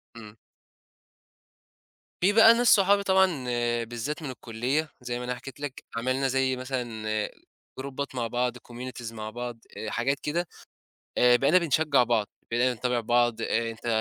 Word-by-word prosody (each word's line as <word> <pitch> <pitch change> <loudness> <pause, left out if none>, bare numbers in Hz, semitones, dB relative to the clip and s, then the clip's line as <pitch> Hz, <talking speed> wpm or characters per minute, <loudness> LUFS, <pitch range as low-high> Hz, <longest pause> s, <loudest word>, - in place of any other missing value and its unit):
امم. 110 -2 -11 1.9
في 200 +3 +4
بقى 225 +1 +8
ناس 240 +1 +1
صحابي، 200 0 +3
طبعًا 190 -1 +5 0.6
بالذات 120 +8 -5
من 145 - -4
الكلية 130 +5 -2
زي 120 0 -4
ما 125 - -5
أنا 125 0 -2
حكيت 135 +1 -10
لِك 145 -2 -6
عملنا 130 +3 0
زي 130 0 +1
مثلًا 125 -4 -4 0.7
جروبات 140 0 -5
مع 120 -2 -1
بعض، 125 +1 -1
communities 120 -1 -8
مع 110 -1 -6
بعض، 120 +1 -6 0.2
آآ، 110 - -4
حاجات 135 +4 0
كده، 170 +4 -2 0.7
آآ 125 0 +6
بقينا 140 +8 +4
بنشجع 155 -5 +3
بعض 115 -3 +1 0.2
بقينا 125 +2 +2
نتابع 125 +1 -1
بعض 120 0 +2
أنت 115 0 -2
125 Hz, 145 wpm, -27 LUFS, 120-140 Hz, 1.9 s, بقى